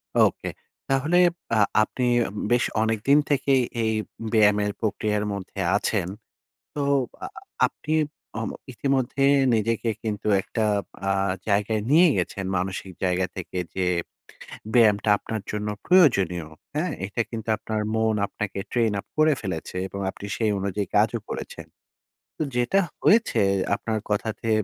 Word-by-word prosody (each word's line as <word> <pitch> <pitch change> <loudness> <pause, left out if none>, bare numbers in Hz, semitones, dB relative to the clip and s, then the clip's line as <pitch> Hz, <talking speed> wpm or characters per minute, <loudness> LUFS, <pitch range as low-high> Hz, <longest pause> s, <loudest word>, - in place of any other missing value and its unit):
OK - - +3 0.5
তাহলে 145 +6 +2 0.4
আ - - +4 0.2
আপনি 125 - -4 0.5
বেশ 120 0 +4 0.2
অনেকদিন 115 +6 +3
থেকেই 135 -2 +3 0.2
এই 110 0 +1 0.4
ব্যায়ামের 105 -1 +4
প্রক্রিয়ার 105 -1 0
মধ্যে 100 0 -7 0.2
আছেন? 100 -4 -1 0.7
তো 145 - -3 0.4
আ - - -2 0.4
আপনি 155 - -6 0.5
ও - - -2 0.3
ইতিমধ্যে 135 +1 0 0.3
নিজেকে 115 +1 0
কিন্তু 105 -1 -3
একটা 110 - -2 0.4
আ - - +2 0.4
জায়গায় 105 +2 +1
নিয়ে 170 +3 +7
গেছেন। 95 +1 -2
মানসিক 95 +1 -3
জায়গা 90 0 +1
থেকে 90 0 -5 0.2
যে 95 -1 0 0.9
ব্যায়ামটা 105 -3 +4
আপনার 110 0 -5
জন্য 105 0 -3 0.2
প্রয়োজনীয়। 100 - +4 0.3
হ্যাঁ? 165 +3 0
এটা 105 +4 -2
কিন্তু 110 -1 -5
আপনার 110 0 -3
মন 110 -1 +2
আপনাকে 100 -1 -4
Train-up 110 -5 0
করে 155 0 +5
ফেলেছে। 90 -2 -5
এবং 100 +1 -7
আপনি 100 - -8
সেই 110 -2 +1
অনুযায়ী 100 0 -2
কাজও - - +2
করেছেন। - - -6 0.9
যেটা 125 +11 +2 0.2
হয়েছে 230 +2 +4 0.4
আপনার 110 +1 -2
কথাতে 110 +2 -2
110 Hz, 125 wpm, -25 LUFS, 100-125 Hz, 0.9 s, নিয়ে